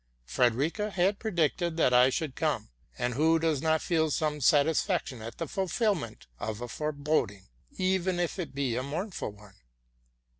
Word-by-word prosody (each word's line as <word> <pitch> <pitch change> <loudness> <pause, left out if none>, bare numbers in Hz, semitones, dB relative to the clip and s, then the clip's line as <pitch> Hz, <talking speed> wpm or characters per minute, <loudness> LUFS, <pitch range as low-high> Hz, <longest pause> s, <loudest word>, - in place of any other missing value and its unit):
Frederica 135 - +1
had 195 +1 +1
predicted 170 -4 0
that 125 -6 +3
I 125 +1 +7
should 145 +1 -2
come; 145 - -1 0.3
and 125 0 -1
who 160 +5 +3
does 160 -4 0
not 160 -1 +1
feel 160 -2 +1
some 150 0 -1
satisfaction 150 - +2
at 115 +1 -8
the 165 - -3
fulfil 205 +3 +1
ment 130 - -7
of 110 -1 -4
a 120 - -5
foreboding, 145 - -2 0.3
even 185 -1 +1
if 175 +2 -1
it 165 -6 -5
be 135 -4 0
a 125 - 0
mournful 165 - -4
one? 105 -1 -17
155 Hz, 160 wpm, -29 LUFS, 125-175 Hz, 0.3 s, I